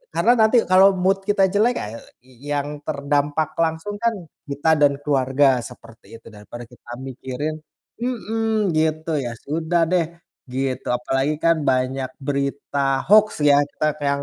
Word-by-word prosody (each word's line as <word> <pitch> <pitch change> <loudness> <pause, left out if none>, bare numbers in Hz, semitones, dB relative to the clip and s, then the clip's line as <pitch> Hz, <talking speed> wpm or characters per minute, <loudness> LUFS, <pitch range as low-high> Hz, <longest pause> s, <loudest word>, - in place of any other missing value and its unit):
Karena 240 - +4
nanti 220 +2 +4
kalo 190 +1 +5
mood 195 +2 0
kita 205 -1 +2
jelek 220 +5 +2
ae 110 +2 -5 0.2
i 130 +2 -16
yang 145 +1 -3
terdampak 145 +1 -1
langsung 165 +5 -1
kan 230 0 0 0.3
kita 145 +3 0
dan 145 -1 +4
keluarga 135 -1 +2
seperti 115 -2 -12
itu, 115 0 -14
daripada 110 +3 -10
kita 120 +1 -19 0.2
mikirin 135 +4 -5 0.4
mhm, 225 -4 -1
gitu 155 0 0
ya 120 -3 -4
sudah 165 +3 0
deh, 170 -2 0 0.3
gitu. 130 0 -3
Apalagi 135 +4 -1
kan 165 0 +4
banyak 130 +1 0 0.2
berita 140 -1 -1
hoax 215 0 +7 0.2
ya, 145 -1 +6
kita 150 - -3
kayak 145 - -2
145 Hz, 145 wpm, -21 LUFS, 135-180 Hz, 0.4 s, hoax